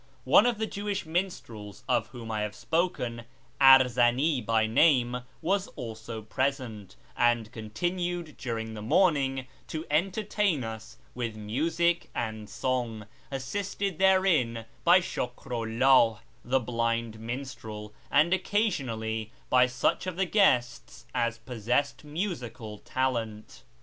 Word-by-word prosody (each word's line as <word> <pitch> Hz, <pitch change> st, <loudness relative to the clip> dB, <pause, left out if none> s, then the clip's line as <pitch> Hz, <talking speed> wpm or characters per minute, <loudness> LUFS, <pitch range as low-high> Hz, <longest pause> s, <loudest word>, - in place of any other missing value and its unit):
One 220 Hz, -, +6 dB
of 240 Hz, -3 st, +1 dB
the 220 Hz, -, -1 dB
Jewish 205 Hz, -3 st, -3 dB
minstrels 155 Hz, -, -4 dB
of -, -, +1 dB
whom 115 Hz, -2 st, -8 dB
I 105 Hz, -1 st, -1 dB
have 105 Hz, 0 st, -3 dB
spoken, 125 Hz, -10 st, -1 dB, 0.4 s
Arzani 130 Hz, +1 st, +5 dB
by 110 Hz, -1 st, +2 dB
name, 125 Hz, 0 st, +3 dB, 0.2 s
was 195 Hz, +3 st, +1 dB
also 115 Hz, -3 st, -7 dB
present, 115 Hz, -5 st, -3 dB, 0.2 s
and 120 Hz, -2 st, +2 dB
continued 175 Hz, +9 st, -3 dB
during 115 Hz, -3 st, -4 dB
the 105 Hz, -, -7 dB
morning 135 Hz, -, +2 dB, 0.2 s
to 160 Hz, +1 st, -5 dB
entertain 195 Hz, -, +1 dB
us 110 Hz, -1 st, -7 dB, 0.2 s
with 120 Hz, -3 st, -3 dB
music 160 Hz, +11 st, 0 dB
and 110 Hz, -2 st, -4 dB
song, 120 Hz, -2 st, -2 dB, 0.2 s
assisted 185 Hz, +7 st, -3 dB
therein 175 Hz, -13 st, +3 dB, 0.2 s
by 175 Hz, +2 st, +6 dB
Shukru 125 Hz, -6 st, -4 dB
Ihih, 130 Hz, -4 st, +5 dB, 0.3 s
the 130 Hz, +2 st, +2 dB
blind 115 Hz, -2 st, -1 dB
minstrel, 115 Hz, -3 st, -6 dB, 0.2 s
and 155 Hz, +5 st, +4 dB
occa 205 Hz, +4 st, +2 dB
sionally 110 Hz, -, -3 dB, 0.2 s
by 125 Hz, 0 st, +6 dB
such 130 Hz, +8 st, 0 dB
of 185 Hz, -, -3 dB
the 190 Hz, +2 st, +1 dB
guests 130 Hz, -, +1 dB
as 115 Hz, -2 st, 0 dB
possessed 125 Hz, +5 st, -1 dB
musical 130 Hz, -, -5 dB
talent. 115 Hz, -5 st, -3 dB
125 Hz, 120 wpm, -28 LUFS, 115-170 Hz, 0.4 s, One